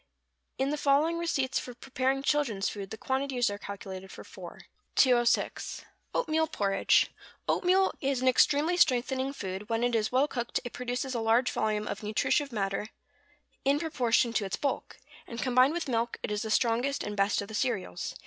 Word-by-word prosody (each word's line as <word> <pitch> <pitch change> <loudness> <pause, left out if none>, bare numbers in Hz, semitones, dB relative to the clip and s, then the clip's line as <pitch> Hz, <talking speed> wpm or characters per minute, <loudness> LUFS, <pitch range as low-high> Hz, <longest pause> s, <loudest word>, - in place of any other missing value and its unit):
In 270 +2 0
the 300 - -1
following 300 +4 +3
receipts 275 -6 0
for 250 - -8
preparing 265 +1 -1
children's 270 -10 +1
food 200 -2 -7
the 220 - -7
quantities 265 -2 0
are 205 - -6
calculated 190 -2 -8
for - - -10
four. - - -11 0.3
206. 240 -3 +2 0.3
=Oatmeal 320 -7 +1
Porridge.= 200 -9 +2 0.4
Oatmeal 380 +1 +3
is 275 -2 0
an 260 - 0
extremely 295 +6 +3
strengthening 260 -2 +2
food; 195 -6 -6
when 230 +1 0
it 245 0 +1
is 220 -2 +1
well 260 +3 +3
cooked 240 -4 -2
it 245 - -7
produces 250 +1 -3
a 235 - -1
large 230 +3 +3
volume 215 -1 -1
of 200 - -4
nutritive 220 +6 0
matter 195 -1 -2 0.8
in 275 +1 +3
proportion 245 -7 +1
to 220 - +1
its 195 - -2
bulk; 280 - -3 0.3
and 235 - -7
combined 255 +3 +4
with 345 - -3
milk 235 -2 -1
it - - -3
is 210 0 -1
the 220 - -4
strongest 240 +5 +1
and 210 - -4
best 200 +1 +2
of - - -9
the 220 - -10
cereals. 200 - -2
245 Hz, 175 wpm, -29 LUFS, 215-275 Hz, 0.8 s, combined